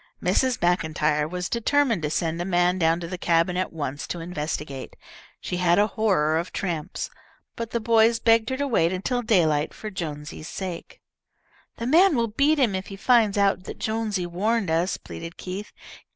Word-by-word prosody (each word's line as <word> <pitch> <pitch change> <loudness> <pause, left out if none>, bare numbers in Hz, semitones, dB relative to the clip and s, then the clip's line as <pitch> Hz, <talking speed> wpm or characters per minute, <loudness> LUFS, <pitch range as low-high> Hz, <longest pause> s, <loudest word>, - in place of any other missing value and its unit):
Mrs. 240 +8 +1
Maclntyre 155 -4 +1
was 180 +1 -3
determined 235 - +1
to 150 - -1
send 165 +2 -1
a - - 0
man 180 0 +2
down 165 0 +3
to 170 - -5
the 180 +1 -6
cabin 170 +1 +2
at 185 +1 -1
once 145 -3 -4
to 175 - -4
investigate. 150 -5 -5 0.4
She 180 - -4
had 175 -1 +3
a 205 - +5
horror 160 -8 +2
of 170 - -5
tramps. 170 -6 -4 0.4
But 230 -1 -4
the 235 - -1
boys 225 0 +4
begged 225 -1 +3
her 260 - -2
to 285 +1 -1
wait 170 -10 +2
until 220 +7 -1
daylight 165 -10 +2
for 215 - -7
Jonesy's 155 -3 -6
sake. 185 -3 -6 0.8
"The 230 - -4
man 330 +6 +5
will 230 -2 +1
beat 280 +8 +2
him 250 -8 +2
if 190 0 -3
he 195 - -7
finds 220 -1 +3
out 195 -2 +2
that - - -7
Jonesy 220 -4 -2
warned 195 +2 0
us," 170 +3 +1
pleaded 165 +1 -9
Keith. 190 +4 -6
185 Hz, 180 wpm, -25 LUFS, 165-225 Hz, 0.8 s, a